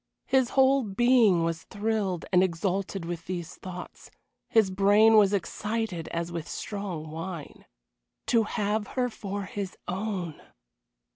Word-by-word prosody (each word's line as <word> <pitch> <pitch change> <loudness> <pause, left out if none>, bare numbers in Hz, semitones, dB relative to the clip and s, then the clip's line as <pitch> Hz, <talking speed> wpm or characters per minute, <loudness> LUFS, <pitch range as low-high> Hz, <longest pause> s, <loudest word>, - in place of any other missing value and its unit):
His 260 -2 +3
whole 270 +1 +5
being 220 -4 +4
was 165 -1 -2
thrilled 205 -4 -1
and 180 - +6
exalted 190 +1 -1
with 170 0 -5
these 175 -3 -5
thoughts; 180 -1 -9 0.4
his 220 -6 +4
brain 205 +3 +5
was 205 -2 +6
excited 205 -2 -2
as 170 0 -3
with 165 -2 -5
strong 185 -7 -5
wine. 165 -1 -7 0.6
To 230 -2 +3
have 210 0 -1
her 250 -1 +2
for 205 -2 -5
his 195 0 -5
own! 185 -4 -3
195 Hz, 130 wpm, -28 LUFS, 175-220 Hz, 0.6 s, and